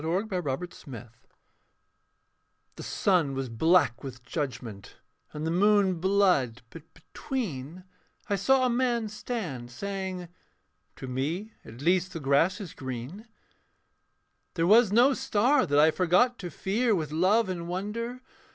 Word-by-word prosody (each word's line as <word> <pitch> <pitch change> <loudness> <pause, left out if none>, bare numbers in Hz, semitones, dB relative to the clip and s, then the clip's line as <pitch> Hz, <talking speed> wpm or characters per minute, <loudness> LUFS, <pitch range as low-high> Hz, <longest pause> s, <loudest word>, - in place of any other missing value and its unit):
FEMINA 175 +7 -1
CONTRA 170 -9 -2 0.3
MUNDUM 120 -3 -9 1.7
The - - -9
sun 170 -9 +1
was 135 -1 -3
black 140 0 +2
with 125 -3 -8
judgment, 120 - -5 0.4
and 150 +1 -5
the 160 - -1
moon 195 -1 +3
Blood: 180 - +2
but 165 -1 -13
between 170 - -6 0.4
I 205 - +1
saw 255 +7 +3
a - - +2
man 240 -3 0
stand, 180 - -5
saying, 190 +3 -5 0.7
'To 130 - -8
me 155 - -3
at 115 +4 -12
least 180 +3 +1
The 165 - -5
grass 145 +6 +2
is 195 -6 -8
green. 130 - -7 1.3
'There 165 -1 +1
was 215 +2 +5
no 245 +6 +5
star 255 +5 +2
that 145 - +1
I 155 +2 +6
forgot 185 +9 +2
to 180 - -5
fear 215 - 0
With 155 -4 -3
love 190 +8 +3
and 175 -2 -4
wonder. 230 +7 -4
180 Hz, 135 wpm, -27 LUFS, 140-210 Hz, 1.7 s, I